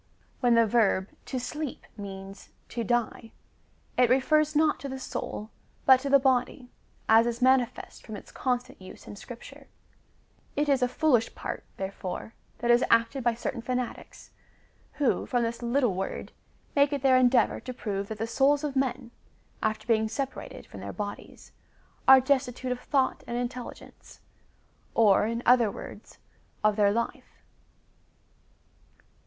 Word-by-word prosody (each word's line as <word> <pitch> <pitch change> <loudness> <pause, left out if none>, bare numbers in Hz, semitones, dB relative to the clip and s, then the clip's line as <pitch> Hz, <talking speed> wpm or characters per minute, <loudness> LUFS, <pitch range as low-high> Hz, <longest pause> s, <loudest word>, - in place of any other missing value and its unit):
When 245 -1 +4
the 230 0 +5
verb 205 -4 +2 0.2
to 260 - -3
sleep 300 +3 -5
means 195 -1 -9 0.2
to 235 - -3
die,^ 235 0 -1 0.7
it 245 - +5
refers 305 +4 +3
not 305 0 +3
to 280 - -6
the 265 - -5
soul, 220 -4 -5 0.3
but 260 -1 +7
to 280 +1 -4
the 280 - +7
body, 260 -1 0 0.4
as 225 +1 +6
is 235 0 -2
manifest 255 -2 +1
from 220 - -8
its 200 - -11
constant 250 -3 -2
use 185 - -12
in - - -9
Scripture.^ 235 +4 -11 0.9
It 295 +1 +1
is 275 -2 +2
a 250 - +3
foolish 250 -4 +1
part, - - -5
therefore, 190 +2 -5 0.2
that 240 +1 +1
is 240 +1 +5
acted 230 +3 +2
by 240 -1 +2
certain 235 +1 -4
fanatics, 250 0 -5 0.6
who, 285 -4 0
from 245 -2 +1
this 235 +1 -3
little 240 -2 +1
word, 190 +1 -4 0.4
make 280 0 +4
it 280 -2 -2
their 265 -1 +5
endeavour 250 -2 +3
to 255 - -7
prove 200 -5 -4
that 220 - -6
the 225 - -2
souls 275 +5 +2
of 290 -2 -3
men, 260 -2 -1 0.5
after 215 0 -1
being 220 -2 +2
separated 265 +5 -5
from - - -11
their - - -6
bodies, 205 -1 -7 0.6
are 265 0 +10
destitute 260 -1 0
of 250 - -2
thought 270 0 0
and 240 0 -3
intelligence, 245 0 -7 0.8
or, 210 -2 +5
in 230 +1 -3
other 240 -3 +5
words, 200 +1 -10 0.5
of 215 -1 +3
their 205 -1 +4
life. 235 +2 -4
245 Hz, 150 wpm, -28 LUFS, 225-265 Hz, 0.9 s, are